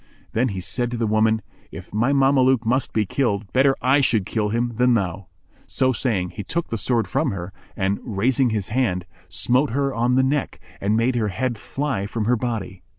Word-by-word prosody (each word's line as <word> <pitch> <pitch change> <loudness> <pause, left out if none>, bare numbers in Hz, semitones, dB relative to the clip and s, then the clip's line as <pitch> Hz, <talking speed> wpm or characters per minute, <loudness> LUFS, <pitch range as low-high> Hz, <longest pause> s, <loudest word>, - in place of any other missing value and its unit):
Then 120 +3 +1
he 100 -5 -4
said 120 +7 -1
to 120 - -4
the 115 - 0
woman, 110 +1 +2 0.3
"If - - -10
my 120 +6 +2
Mameluke 135 -3 +3
must 130 +3 +1
be 110 -1 +1
killed, 105 -4 -1
better 135 +1 +4
I 135 +3 +4
should 110 -7 +2
kill 105 0 -1
him 120 +2 -1
than 125 0 +4
thou." 100 -2 -2 0.4
So 130 0 +1
saying, 100 -8 -1
he 100 - -6
took 170 - -3
the 115 - -2
sword 115 +2 0
from - - 0
her 90 -1 -5 0.2
and, 95 +1 0
raising 125 +4 +1
his 105 -3 -2
hand, 105 -7 0 0.2
smote 125 - +1
her 140 +3 0
on 120 +1 +1
the 130 - +4
neck 140 +1 -1 0.2
and 105 +2 +1
made 120 +3 +2
her 110 -2 +1
head 115 +3 -2
fly 135 -8 -3
from 110 0 -3
her 125 +3 +3
body. 110 -6 -4
115 Hz, 205 wpm, -22 LUFS, 105-130 Hz, 0.4 s, better